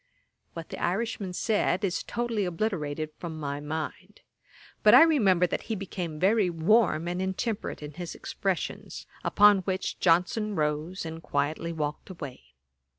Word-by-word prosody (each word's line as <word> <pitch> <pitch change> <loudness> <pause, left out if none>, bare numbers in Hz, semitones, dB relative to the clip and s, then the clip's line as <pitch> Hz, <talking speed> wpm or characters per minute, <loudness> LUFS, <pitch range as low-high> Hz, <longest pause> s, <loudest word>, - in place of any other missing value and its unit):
What 165 -1 -7
the - - -7
Irishman 195 0 -1
said 205 -1 +1
is 185 -3 0
totally 235 -3 -2
obliterated 165 -5 -2
from 160 -2 -6
my 140 -1 -3
mind; 160 +7 -6 0.6
but - - +8
I - - +10
remember 205 - +4
that - - -3
he 220 - 0
became 180 -5 -5
very 200 +1 +3
warm 170 -1 +3
and 180 +1 -2
intemperate 190 -1 -3
in 150 - -6
his 175 +3 -7
expressions; 195 -4 -3 0.2
upon 205 -1 +6
which 190 0 -3
Johnson 190 +5 +2
rose, 155 +4 -1
and 160 0 -6
quietly 160 +2 -1
walked 150 0 -4
away. 130 - -9
180 Hz, 145 wpm, -28 LUFS, 155-205 Hz, 0.6 s, I